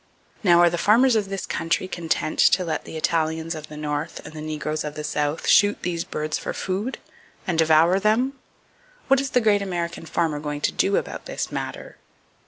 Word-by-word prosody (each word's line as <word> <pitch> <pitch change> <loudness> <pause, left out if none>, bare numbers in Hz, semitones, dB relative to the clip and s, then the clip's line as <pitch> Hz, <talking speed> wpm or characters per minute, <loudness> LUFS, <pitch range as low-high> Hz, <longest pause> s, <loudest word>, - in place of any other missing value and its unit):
Now, 175 -4 +6
are 175 - +6
the 175 - -2
farmers 235 +6 +4
of 205 -3 0
this 195 -2 -4
country 165 +3 -1
content 165 -3 -2
to 185 - +5
let 160 -2 -3
the 160 - -7
Italians 160 +1 0
of 155 -1 -8
the 150 - -10
North, 150 +2 -3
and - - -9
the 155 - -7
negroes 155 0 -3
of 150 0 -5
the 150 - -5
South, 150 +1 -2
shoot 205 0 +4
those 170 -2 -1
birds 155 0 -3
for - - -4
food, 200 +7 -3 0.5
and 175 -4 -1
devour 165 +3 +5
them? 225 +6 +2 0.8
What 270 0 +5
is 275 - -3
the 250 - +2
great 210 -2 +3
American 170 -3 -4
farmer 160 -2 0
going 145 0 -4
to - - +1
do 195 - +1
about - - -4
this - - -4
matter? - - -6
165 Hz, 195 wpm, -23 LUFS, 155-195 Hz, 0.8 s, Now